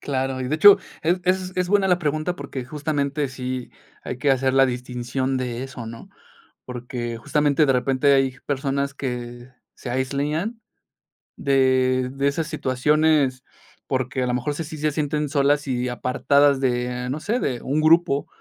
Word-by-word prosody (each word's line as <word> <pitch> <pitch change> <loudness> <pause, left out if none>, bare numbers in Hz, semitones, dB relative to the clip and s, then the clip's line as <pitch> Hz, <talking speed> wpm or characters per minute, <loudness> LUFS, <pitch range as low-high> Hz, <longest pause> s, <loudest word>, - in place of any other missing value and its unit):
Claro, 135 -1 -2
y 125 - -3
de 150 - 0
hecho 200 +5 +8 0.2
es 170 +3 +2
es 185 0 0
es 180 -1 0
buena 200 0 +3
la 180 -1 +3
pregunta 155 +2 -1
porque 140 -2 -6
justamente 145 0 -2
sí 130 -1 -5 0.3
hay - - -5
que 145 +1 +2
hacer 130 0 +2
la 135 0 +6
distinción 125 +1 -3
de 125 -1 -3
eso, 135 -3 -7
¿no?, 115 0 -10 0.6
porque 120 -1 -5
justamente 145 +5 +2
de 135 - +3
repente 135 +2 +2
hay 135 -1 +2
personas 140 0 -1
que 120 -2 -6 0.2
se 125 - -8
aislan 145 - -2 0.8
de 130 -2 +2
de 140 +1 0
esas 150 +3 -1
situaciones, 150 -2 +1 0.4
porque 130 0 -1
a - - -1
lo 125 - 0
mejor 130 +4 -1
sí 165 - -3
sí 155 - -8
sí - - -10
se 155 - +2
sienten 150 0 -1
solas 145 0 +2
y 125 -1 -1
apartadas 135 +3 +2
de, 125 -1 -1
no 140 +4 -3
sé, 230 +8 -1
de 125 - -2
un 145 +3 -1
grupo, 160 -2 +3
135 Hz, 170 wpm, -23 LUFS, 130-150 Hz, 0.8 s, hecho